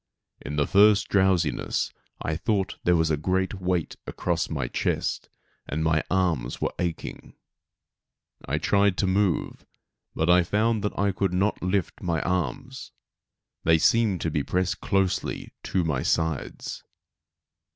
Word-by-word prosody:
In 75 - -5
the 75 -1 +2
first 105 +3 +5
drowsiness 95 -6 +1 0.3
I 80 - -1
thought 95 +2 -1
there 90 - +4
was 80 -1 +2
a 75 - +2
great 95 +4 -1
weight 90 -2 -1
across 85 -2 -1
my 70 -6 -2
chest; - - -2 0.4
and 80 +2 -1
my 80 -1 +2
arms 85 -10 0
were - - -1
aching. 85 -2 -4 1.1
I 70 +3 0
tried 100 +4 +2
to - - +1
move, 95 -1 0 0.5
but 90 +2 +4
found 110 +1 +1
that 105 - -2
I 100 0 +2
could 95 -1 -1
not 100 +4 0
lift 95 -1 -1
my 85 -2 0
arms. 125 +9 -3 0.7
They 80 0 +5
seemed 105 +1 +3
to 80 - -1
be 75 - 0
pressed 90 +5 -1
closely 95 -2 -1
to 95 - 0
my 75 -5 0 0.2
aides. 80 -4 -4
90 Hz, 140 wpm, -26 LUFS, 80-100 Hz, 1.1 s, first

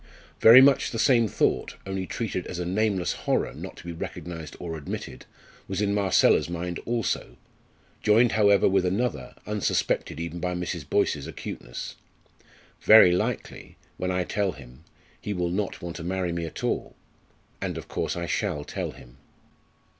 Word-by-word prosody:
Very 115 +4 +10
much 135 0 +5
the 115 - -5
same 115 0 +4
thought - - 0
only 95 -1 -3
treated 105 -6 -3
as 90 - -5
a 90 - -3
nameless 95 0 0 0.2
horror - - +1
not - - -9
to - - -11
be 85 - -6
recognised 85 -1 -7
or 85 -2 -5
admitted 75 -3 -7 0.4
was 95 +1 -3
in 100 -1 +1
Marcella's 100 -4 +3
mind 85 0 -4
also, 115 - -2 0.6
joined 115 +3 +4
however 100 -2 +4
with 95 -1 +3
another, 105 +7 -2
unsuspected 105 -6 -1
even 85 +1 -5
by 90 +1 -2
Mrs. 90 0 -4
Boyce's - - +1
acuteness. - - -7 0.8
"Very 110 -5 +8
likely 90 - -3 0.2
when 90 - -2
I 90 0 0
tell 100 0 -1
him 65 +1 -14 0.4
he 105 - -3
will 90 -2 -1
not 100 0 -3
want 85 -1 -5
to 85 - -7
marry 90 0 -1
me 85 -1 -3
at - - -8
all - - -2 0.7
and - - -3
of - - -8
course - - -2
I 85 0 -3
shall 85 -5 -2
tell - - -5
him." - - -16
90 Hz, 160 wpm, -26 LUFS, 85-105 Hz, 0.8 s, Very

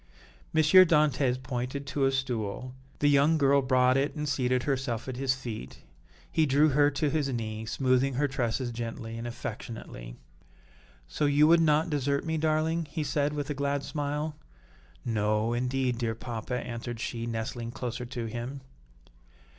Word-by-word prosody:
M. 160 - +3
Dantès 150 -7 +5
pointed 130 +2 -3
to 140 0 0
a 135 - +3
stool; 125 -2 -3 0.2
the 145 - +2
young 145 +3 +4
girl 140 -1 +4
brought 130 -1 +3
it 140 +4 0
and 150 -1 -3
seated 130 -2 +1
herself 130 -4 -2
at 130 - -4
his 130 -1 +1
feet; 115 - -7 0.5
he 160 -1 +2
drew 145 +3 +4
her 145 +1 +4
to 145 0 -1
his 150 -3 0
knee, 110 -3 -4
smoothing 130 +2 +1
her 145 +3 +2
tresses 125 -2 -1
gently 115 -1 -5
and 115 +1 -5
affectionately. 110 - -7 0.9
"So 145 - 0
you 145 +1 +5
would 165 +1 +6
not 155 +1 +3
desert 140 0 0
me, 160 -1 -1
darling?" 160 +1 +1
he 155 +1 -2
said, 145 0 0
with 145 -1 -3
a - - 0
glad 140 0 -1
smile. 150 +1 -3 0.7
"No, 110 0 +1
indeed, 125 0 0
dear 115 -2 -1
papa," 115 +1 -5
answered 120 -1 -6
she, 115 0 -4
nestling 115 +1 -4
closer 125 0 -4
to 120 -1 -4
him. 120 +5 -5
130 Hz, 160 wpm, -28 LUFS, 120-145 Hz, 0.9 s, would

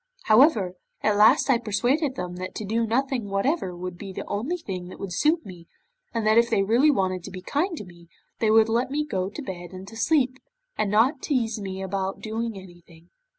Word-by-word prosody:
However, 215 - +5 0.3
at 210 -1 +3
last 220 +7 +5
I 260 -4 +4
persuaded 245 +6 0
them 180 -5 -5
that 185 +1 -6
to 215 - -4
do 225 +3 0
nothing 245 -2 -1
whatever 195 - 0
would 180 -1 -6
be 195 -2 -7
the - - -6
only 260 +13 -2
thing 185 - -6
that 185 - -10
would 195 -3 -5
suit 315 - +2
me, 175 -3 -11 0.4
and 230 -2 -2
that 215 +2 +5
if 235 0 +2
they 195 - +2
really 235 +9 +4
wanted 185 - 0
to - - -6
be 185 -1 -9
kind 330 - -1
to 210 - -7
me, 170 -1 -16 0.3
they 220 - +2
would 220 0 +6
let 235 +3 0
me 300 +2 -1
go 190 -9 -2
to 255 - -7
bed 175 -4 -7
and 185 +1 -9
to 225 - -12
sleep, 260 +1 +1 0.4
and 210 - 0
not 240 +8 +3
tease 230 -6 -1
me 190 -1 -5
about 190 0 -3
doing 225 0 -4
anything. 175 -2 -15
215 Hz, 215 wpm, -25 LUFS, 185-255 Hz, 0.4 s, would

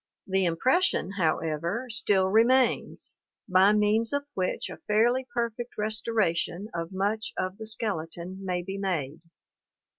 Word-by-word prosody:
The 190 -1 +1
impression, 195 - +2
however, 165 +6 0
still 205 -4 +3
remains, 235 +5 +2 0.3
by 185 +2 +5
means 210 +3 +2
of 285 0 -1
which 185 -1 -1
a - - -9
fairly 240 +5 +2
perfect 235 +1 -3
restoration 210 -3 -1
of 165 +1 -4
much 205 +3 -1
of 185 +3 -3
the 220 - -7
skeleton 185 -3 -4
may 180 -2 -2
be 195 +2 -5
made. 165 -6 -2
200 Hz, 125 wpm, -27 LUFS, 180-225 Hz, 0.3 s, by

